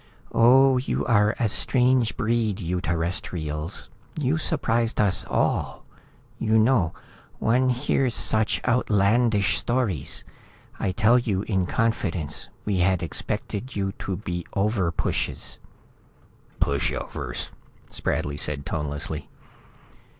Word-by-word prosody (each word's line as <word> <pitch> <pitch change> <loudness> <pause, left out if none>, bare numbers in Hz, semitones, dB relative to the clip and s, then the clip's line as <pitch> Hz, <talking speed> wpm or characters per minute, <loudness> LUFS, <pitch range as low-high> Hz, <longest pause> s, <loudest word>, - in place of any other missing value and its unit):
"Oh, 130 +3 +6
you 130 - -2
are 105 -2 +3
a 115 - +2
strange 125 +1 +2
breed, 115 -3 0
you 90 -1 -2
Terrestrials. 80 -1 -3 0.3
You 150 +1 +1
surprised 120 -8 0
us 100 -3 +2
all. - - 0 0.5
You 110 0 +2
know, 110 -7 +3 0.4
one 125 +3 +2
hears 125 -1 +1
such 110 -1 +1
outlandish 110 -2 +3
stories. 120 - -1 0.6
I 95 - 0
tell 110 +5 +4
you 100 -5 -1
in 95 -5 0
confidence, 90 - -1 0.2
we 100 -2 0
had 90 0 +2
expected 105 - -4
you 95 -1 -1
to 95 - -3
be 90 -3 -4
overpushes." 100 -4 -1 1.0
"Pushovers," 70 0 -2 0.4
Spradley 70 0 -2
said, 70 -2 -1
tonelessly. 75 -1 -4
105 Hz, 105 wpm, -25 LUFS, 90-120 Hz, 1.0 s, Oh